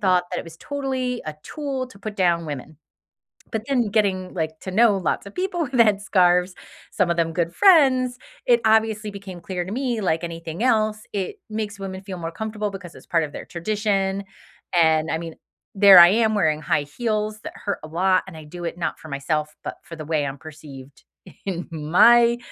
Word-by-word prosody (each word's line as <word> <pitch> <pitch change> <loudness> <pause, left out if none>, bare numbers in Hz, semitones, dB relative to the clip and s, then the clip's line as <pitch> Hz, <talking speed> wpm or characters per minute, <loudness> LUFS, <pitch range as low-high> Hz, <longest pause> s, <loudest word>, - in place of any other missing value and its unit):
thought 185 -2 +3
that - - -2
it - - -5
was 165 -1 -12
totally 260 -3 -3
a 155 - -4
tool 275 -4 -4
to 200 - -16
put 210 +1 -6
down 170 -3 +1
women, 145 +1 -7 0.8
but 220 -2 -3
then 245 -6 +1
getting, 195 -4 0
like, 160 -2 -3
to 190 - -6
know 215 0 +4
lots 185 0 -2
of 200 - -11
people 360 -3 -1
in 260 - -10
headscarves- 190 -4 +3 0.4
some 180 -2 +1
of 170 - -1
them 165 -1 0
good 170 0 -1
friends- 260 -10 +5 0.3
it 485 -1 +4
obviously 220 -1 +2
became 195 -3 -9
clear 180 0 -4
to 190 - -7
me 250 -3 -1
like 165 -2 0
anything 165 +3 -5
else, 215 -3 +1
it 200 - -3
makes 210 -2 -4
women 190 -1 -6
feel 190 -2 -7
more 165 0 -4
comfortable 215 +3 -4
because 185 -3 -9
it's - - -15
part 165 -2 +2
of 145 - -6
their - - -7
tradition. 195 +1 -1 0.6
And, 160 -1 +3
I 160 - 0
mean, 165 -1 -7 0.4
there 195 -2 +9
I 170 0 +10
am 220 +1 +2
wearing 155 -6 +1
high 145 - 0
heels 215 +5 -3
that - - -8
hurt 200 -1 -4
a - - -7
lot 185 +3 +2
and 165 -4 -10
I 155 - -10
do 175 +3 -9
it 170 - -4
not 170 - -3
for 160 - -12
myself, 150 +2 -2
but - - -6
for 165 - -10
the 155 - -7
way 155 -2 0
I'm 140 0 -5
perceived 140 -2 -12 0.4
in 180 -3 -4
my 235 +10 +5
190 Hz, 205 wpm, -23 LUFS, 165-220 Hz, 0.8 s, I